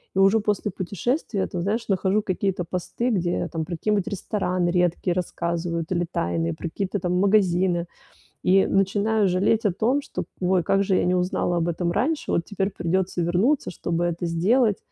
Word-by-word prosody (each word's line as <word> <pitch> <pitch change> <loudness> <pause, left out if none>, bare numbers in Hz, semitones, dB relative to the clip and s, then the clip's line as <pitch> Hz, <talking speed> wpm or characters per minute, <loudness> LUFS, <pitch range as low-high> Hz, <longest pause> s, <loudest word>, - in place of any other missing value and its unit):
и - - +1
уже 195 +3 +5
после 210 -1 -1
путешествия, 200 - -2
там, 175 - -4
знаешь, 215 +6 -1
нахожу 195 +1 +1
какие-то 190 -2 -1
посты, 180 +8 -2
где, 175 -5 0
там, 160 -2 -3
про 170 -1 -5
какие-нибудь 210 +1 0
рестораны 185 -3 -1
редкие 175 0 +1
рассказывают 170 -1 -2
или 175 -1 +1
тайные, 85 - -1
про 165 - -5
какие-то 195 +3 -3
там 180 0 -1
магазины 185 -3 +2 0.6
и 190 +1 +4
начинаю 200 +2 +2
жалеть 205 +5 +2
о 205 - +4
том, 250 +9 +1
что 180 -9 -5 0.2
"ой, 180 -1 +2
как 195 +4 +2
же 190 -1 +1
я - - +1
не 180 +1 +2
узнала 180 -1 0
об 170 0 0
этом 170 +1 -1
раньше, 290 - -1
вот 170 - +1
теперь 200 0 -2
придется 180 0 -1
вернуться, 185 - +1
чтобы 170 -1 -2
это 175 0 -2
сделать". 205 +7 +2
185 Hz, 175 wpm, -24 LUFS, 175-205 Hz, 0.6 s, уже